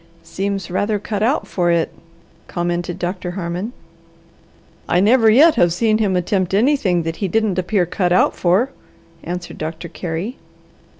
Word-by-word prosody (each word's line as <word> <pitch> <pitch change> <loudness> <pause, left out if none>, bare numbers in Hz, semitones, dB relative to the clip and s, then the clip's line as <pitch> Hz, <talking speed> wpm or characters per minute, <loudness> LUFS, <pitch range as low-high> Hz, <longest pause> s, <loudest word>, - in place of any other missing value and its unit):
"Seems 195 -1 -3
rather 205 +3 0
cut 205 0 -4
out 250 +7 +1
for 175 -2 0
it," 170 -1 +1 0.5
commented 175 0 -2
Doctor 180 0 -3
Harmon. 180 +5 -3 1.2
"I 175 - +3
never 225 +3 +5
yet 300 +9 +6
have 175 -5 +4
seen 215 +5 +1
him 200 -4 +1
attempt 185 +1 0
anything 210 - +2
that 165 0 -4
he 200 - -1
didn't 215 -1 0
appear 185 0 +1
cut 175 +1 -1
out 180 - +3
for," 195 +10 +2 0.5
answered 175 +1 -6
Doctor 160 +2 -5
Carey. 175 +8 -5
185 Hz, 145 wpm, -19 LUFS, 175-215 Hz, 1.2 s, yet